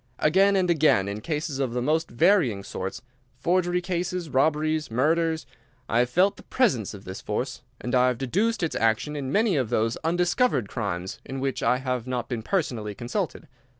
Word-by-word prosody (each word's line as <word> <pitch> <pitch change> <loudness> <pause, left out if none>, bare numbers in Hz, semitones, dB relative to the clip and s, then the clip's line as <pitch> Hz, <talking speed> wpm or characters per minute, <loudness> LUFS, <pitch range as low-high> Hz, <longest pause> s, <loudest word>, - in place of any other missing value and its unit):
Again 195 +6 +4
and 185 -2 +2
again 155 - +3
in 100 +1 -4
cases 150 0 -3
of 130 -4 -1
the 125 - -1
most 160 +4 +1
varying 135 - +3
sorts—forgery 130 - -2
cases, 180 -2 -3
robberies, 155 +3 +1
murders—I 145 -2 -1
have 120 0 +2
felt 190 +8 +3
the - - -12
presence 130 - 0
of 100 - -11
this 95 +1 -7
force, - - -3 0.2
and 120 - -4
I 125 0 +5
have 125 -2 0
deduced 195 - 0
its 165 - -1
action 115 +7 +1
in 135 -2 -3
many 210 -1 +3
of 125 -5 0
those 115 +1 +1
undiscovered 175 - +1
crimes 95 -5 -4
in 135 0 -6
which 135 -1 -2
I 125 - +3
have 125 -2 -3
not 125 -2 -3
been 120 -3 -2
personally 115 - -2
consulted. 155 - -3
135 Hz, 175 wpm, -26 LUFS, 120-175 Hz, 0.2 s, I